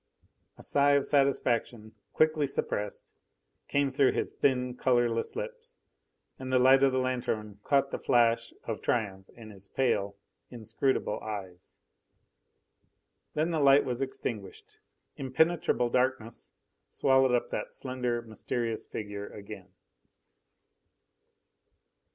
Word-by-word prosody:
A - - -11
sigh 140 0 +3
of 140 -1 +3
satisfaction, 120 -5 0 0.2
quickly 155 -2 +2
suppressed, 105 -6 -4 0.5
came 140 -1 +1
through 135 0 +3
his - - -2
thin, 125 -2 +1
colourless 120 -2 +1
lips, 480 0 -7 0.6
and 130 0 -5
the 130 - +4
light 130 +2 +6
of 135 -1 +5
the 130 - 0
lanthorn 125 -5 -2
caught 140 -1 +2
the - - -3
flash 115 -1 +2
of 115 -2 -4
triumph 95 -5 -2
in 110 -2 -11
his 100 -1 -11
pale, 100 -6 0 0.3
inscrutable 115 0 -1
eyes. 95 -4 -8 1.6
Then 155 +3 +1
the 160 - 0
light 140 0 +6
was 125 0 -2
extinguished. 115 -7 -6 0.4
Impenetrable 135 -3 +1
darkness 125 -3 0 0.4
swallowed 130 -2 +3
up 120 - -1
that - - -4
slender, 125 -2 -2
mysterious 115 0 -4
figure 100 -1 -6
again. 100 -1 -10
125 Hz, 115 wpm, -29 LUFS, 110-135 Hz, 1.6 s, light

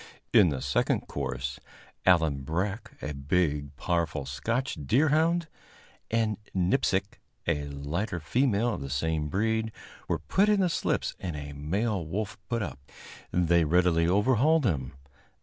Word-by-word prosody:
In 95 -5 +7
the 65 -3 -3
second 70 0 +1
course, 65 +2 -4 0.5
Allan 80 -6 +4
Breck, 100 - -3
a 75 - -3
big, 70 0 0
powerful 80 -3 -1
Scotch 115 - -2
deerhound, 160 +6 +3 0.6
and 110 -2 +1 0.2
Nipsic, 95 +1 +1 0.3
a 75 -1 0
lighter 80 +8 -3
female 115 - +1
of - - -5
the 70 - -5
same 75 +2 0
breed, 110 +4 0 0.4
were - - +1
put 200 +2 +2
in 205 -2 +4
the 180 - +3
slips - - 0
and 85 -4 -4
a 75 -1 -6
male 95 +7 -1
wolf 100 +7 -4
put 115 -2 0
up. 65 -8 -6 0.5
They 85 -1 +3
readily 85 +1 +3
overhauled 130 - +3
him. 75 - -1
90 Hz, 135 wpm, -28 LUFS, 75-110 Hz, 0.6 s, In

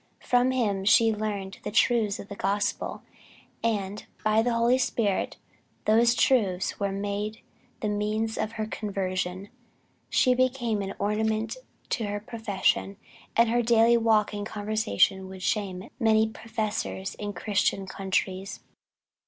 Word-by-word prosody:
From 245 +1 +3
him 215 -7 0
she 220 +2 +5
learned 205 -3 -4
the - - -4
truths 220 -2 +2
of - - -9
the 200 - -7
gospel, 200 +1 -1 0.6
and 205 -2 -2 0.2
by 215 0 +4
the 240 +2 +1
Holy 235 +2 +3
Spirit 225 -5 0 0.5
those 235 +2 +4
truths 195 -10 +2
were 200 -1 0
made 205 +2 -3 0.4
the 215 - -1
means 210 +2 -1
of 215 +1 -2
her 220 -1 -2
conversion. 190 -2 -3 0.6
"She 255 - +4
became 245 -4 +1
an 195 0 -4
ornament 220 - 0 0.3
to 230 - -1
her 205 0 -3
profession, 205 -2 -1 0.4
and 230 0 +5
her 240 +1 +2
daily 235 0 +5
walk 220 -2 +3
and 205 0 -3
conversation 205 -3 +1
would 190 -1 -9
shame 190 -4 -2
many 220 -2 +4
professors 220 -3 -3
in 205 -1 -3
Christian 200 -2 0
countries." 190 +1 -2
215 Hz, 135 wpm, -27 LUFS, 200-225 Hz, 0.6 s, she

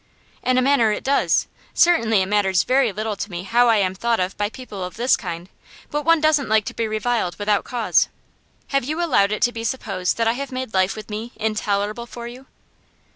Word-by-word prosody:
'In 255 0 +1
a 255 - +3
manner 260 -5 +3
it 210 - -3
does. 280 +1 +2 0.3
Certainly 230 - +4
it - - -2
matters 190 -2 +2
very 255 -3 +2
little 215 +2 -3
to 210 +2 -5
me 175 -1 -5
how 240 +5 +3
I 225 - +5
am 190 -2 +1
thought 230 +4 0
of 185 +1 -1
by 205 0 -1
people 215 -5 -8
of 180 0 -6
this 245 +3 +3
kind, 175 -3 -6 0.4
but 295 - -1
one 330 0 +5
doesn't 305 -4 +2
like 220 -1 +3
to - - -5
be 230 - -2
reviled 215 -5 -1
without 205 0 0
cause. 240 -3 +1 0.6
Have 275 -2 +1
you 305 +6 -3
allowed 255 -12 +2
it 215 - -1
to 245 - +3
be 225 -1 -6
supposed 220 -6 -2
that 230 -1 +1
I 225 - +3
have 275 +2 -5
made 255 -3 -5
life 190 0 +2
with 215 0 -9
me 225 +3 -5
intolerable 215 +1 -2
for 235 0 -8
you? 255 +3 -11
225 Hz, 220 wpm, -22 LUFS, 205-255 Hz, 0.6 s, I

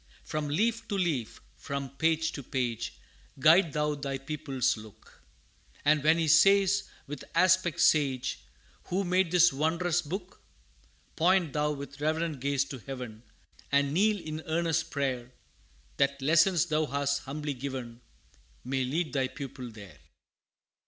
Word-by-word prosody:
From 155 -1 -3
leaf 230 +8 0
to 205 - -2
leaf, 155 - -2
from 140 -2 -5
page 160 0 +1
to 140 - -6
page, 125 -3 -3 0.4
Guide 160 +4 +5
thou 150 0 0
thy 140 -2 -4
pupil's 135 -2 -1
look, 110 0 -15 0.6
And 150 -1 +4
when 160 +2 +5
he 165 -1 0
says, 195 +4 +5 0.2
with 145 +1 -7
aspect 180 -1 +3
sage, 135 -4 +2 0.5
"Who 190 +3 -1
made 180 0 +2
this 180 -1 +5
wondrous 165 +4 +1
book?" 180 +4 -7 0.7
Point 175 -2 +2
thou 150 0 +1
with 140 0 -9
reverent 160 -1 -1
gaze 140 +1 0
to 135 - -6
heaven, 125 -4 -7 0.5
And 140 0 +2
kneel 205 +4 +3
in 155 -2 -6
earnest 165 0 0
prayer, 130 -3 -2 0.6
That 140 0 +1
lessons 170 +5 +4
thou 155 -2 0
hast 140 +1 0
humbly 145 +1 -4
given, 125 -3 -6 0.6
May 130 +1 -1
lead 155 +6 -2
thy 135 -2 +1
pupil 130 -1 -8
there. 100 -9 -13
150 Hz, 140 wpm, -29 LUFS, 135-170 Hz, 0.7 s, Guide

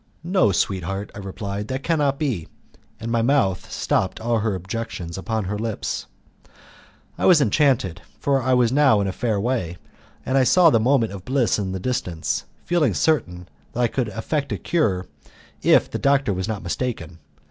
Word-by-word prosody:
"No, 170 - +3
sweetheart," 95 +1 -2
I - - -8
replied, 100 +1 -5
"that 130 +1 -4
cannot 145 -4 +1
be." 125 - -2 0.5
And 115 0 -4
my 115 -1 +2
mouth 115 -7 +1
stopped 95 - 0
all 115 0 0
her 105 -2 0
objections 95 -2 -5
upon 110 +3 -2
her 105 +2 -3
lips. 110 -1 -3 1.1
I - - +2
was 175 -4 +7
enchanted, 120 - +2 0.2
for 140 -1 +1
I 130 0 +2
was 120 -2 +3
now 135 -6 +4
in - - 0
a 95 - -1
fair 110 +1 -1
way, 100 -7 -1 0.5
and 135 +1 +2
I - - +5
saw 165 +7 +6
the 115 - +4
moment 120 -1 +2
of 95 -2 -8
bliss 130 -3 +1
in 95 -2 -2
the 95 - -3
distance, 90 -7 -2 0.2
feeling 155 - +2
certain 90 - 0 0.3
that - - -5
I 120 - +4
could 125 0 -2
effect 140 +7 -3
a - - -1
cure 100 - 0 0.6
if - - +5
the - - -3
doctor 140 -6 +2
was 95 +1 -3
not 110 -3 -4
mistaken. 85 -4 -4
115 Hz, 180 wpm, -23 LUFS, 95-135 Hz, 1.1 s, was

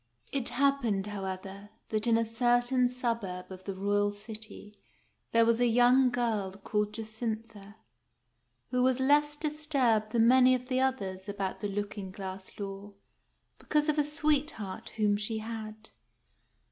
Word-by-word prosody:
It 270 -3 -1
happened, 250 -8 +1
however, 195 0 -6 0.2
that 215 +1 -1
in 230 -1 +4
a 230 - +1
certain 245 +2 +2
suburb 230 -8 -3
of 185 0 -10
the 195 - -4
royal 205 +1 +1
city 210 0 -9 0.5
there 230 0 +5
was 230 0 +3
a 245 - +4
young 245 +2 +5
girl 230 -6 -1
called 210 +1 -2
Jacintha, 220 -2 -5 1.0
who 250 0 +1
was 255 0 +3
less 295 +2 +3
dis 305 0 -2
turbed 235 -7 +2
than 230 0 +4
many 255 +1 +6
'of 250 +1 -6
the 255 0 +1
others 205 -7 -1
about 200 -2 -3
the 205 - -2
looking 205 -1 -4
glass 190 0 -7
law, 200 0 -6 0.7
because 300 0 +1
of 305 0 +2
a - - +4
sweetheart 295 - -1
whom 210 -1 +2
she 215 +2 -2
had. 220 -1 -7
225 Hz, 145 wpm, -30 LUFS, 205-250 Hz, 1.0 s, many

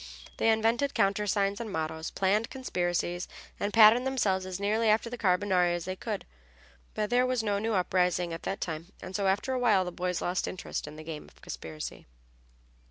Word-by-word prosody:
They 225 - +3
invented 225 +5 +2
countersigns 200 0 +1
and 220 -3 -5
mottoes, 160 -1 -3
planned 205 +4 +1
conspiracies, 175 -8 -2 0.3
and 205 - -1
patterned 225 +4 +7
themselves 195 -8 0
as 185 0 -5
nearly 215 +2 +2
after 225 +2 +2
the - - -3
Carbonari 180 -3 +2
as 175 - -4
they 185 - -3
could. - - -4 0.7
But 210 +1 -1
there 250 +1 +4
was 255 -3 0
no 205 -2 0
new 220 +1 0
uprising 180 -2 +1
at 165 - -6
that 195 - -4
time, 165 +3 -5
and 185 - -8
so 200 0 +1
after 205 +7 +1
a 255 - 0
while 210 -6 +4
the 180 - -4
boys 180 0 -2
lost 180 +1 -1
interest 185 - -5
in 150 - -9
the 155 - -9
game 155 -1 -7
of - - -20
conspiracy. 80 -1 -7
195 Hz, 190 wpm, -29 LUFS, 180-220 Hz, 0.7 s, patterned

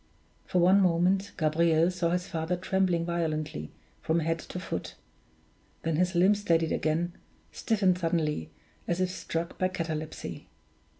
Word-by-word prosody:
For - - 0
one 185 +3 +6
moment, 185 +2 +2
Gabriel 165 +1 +3
saw 180 -2 0
his 180 +1 0
father 165 +1 -1
trembling 185 -2 +1
violently 155 - -2 0.3
from 165 +1 +1
head 165 +1 0
to 180 - -7
foot 170 - -5 0.9
then 165 -2 0
his 180 +1 +1
limbs 195 +4 +4
steadied 165 -4 +2
again 165 +3 0 0.4
stiffened 195 -5 +1
suddenly, 160 - 0 0.4
as 170 - 0
if 185 -1 +1
struck 170 -2 -4
by 185 - +3
catalepsy. 160 -4 -5
170 Hz, 135 wpm, -29 LUFS, 160-185 Hz, 0.9 s, one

